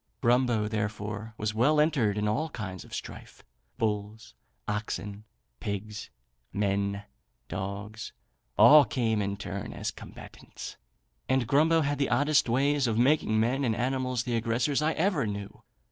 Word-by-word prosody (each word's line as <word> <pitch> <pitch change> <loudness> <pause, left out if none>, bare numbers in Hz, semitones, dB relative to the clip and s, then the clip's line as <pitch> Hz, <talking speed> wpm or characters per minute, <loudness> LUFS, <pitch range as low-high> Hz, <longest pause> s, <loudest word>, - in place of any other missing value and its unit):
Grumbo, 120 -3 +2
therefore, 105 0 -4
was 105 0 -2
well 140 +8 +3
entered 135 -10 +2
in 105 0 0
all 150 +10 0
kinds 95 - -6
of - - -16
strife - - -8 0.3
bulls, 105 0 -3 0.3
oxen, 105 -1 -4 0.3
pigs, 105 -1 -5 0.4
men, 100 0 -1 0.4
dogs, 100 +4 -5 0.5
all 150 0 +9
came 115 -3 0
in 100 0 -2
turn 100 -1 -5
as - - -3
combatants; - - -10 0.5
and 130 -2 +2
Grumbo 160 +6 +4
had 145 -1 -1
the 140 - +1
oddest 145 -3 +3
ways 140 +2 +2
of 110 -1 0
making 120 -3 +3
men 125 +5 +1
and 115 -4 +1
animals 130 0 -1
the 120 -1 -2
aggressors 115 +5 +1
I 155 +1 +2
ever 160 - +1
knew. 100 -1 -6
110 Hz, 140 wpm, -28 LUFS, 105-135 Hz, 0.5 s, all